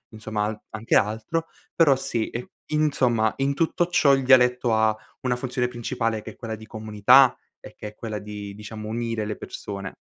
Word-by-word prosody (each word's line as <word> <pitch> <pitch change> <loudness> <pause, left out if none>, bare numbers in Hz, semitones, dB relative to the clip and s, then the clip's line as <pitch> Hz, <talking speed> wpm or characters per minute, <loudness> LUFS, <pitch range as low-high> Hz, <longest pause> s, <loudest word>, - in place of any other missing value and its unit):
insomma 110 -1 -2
a 105 0 -4
anche 110 +1 -1
altro. 110 +11 +1 0.3
Però, 150 -5 +5
sì, 130 -4 -2
e, 120 +1 -7 0.2
insomma, 125 -8 +2
in 135 +1 +1
tutto 165 +3 +1
ciò, 145 -5 +4
il 135 - -2
dialetto 125 -2 +4
ha 110 0 +2 0.2
una 125 -1 0
funzione 125 0 -2
principale 115 -2 -2
che - - -7
è - - -17
quella 115 -2 -5
di 110 0 -12
comunità 110 +4 +4 0.2
e - - -13
che 105 - -7
è 105 - -17
quella 110 -1 -5
di, 105 0 -7
diciamo, 105 +1 -8
unire 115 -1 -2
le 105 0 -3
persone. 100 -2 -7
115 Hz, 185 wpm, -24 LUFS, 110-130 Hz, 0.3 s, Però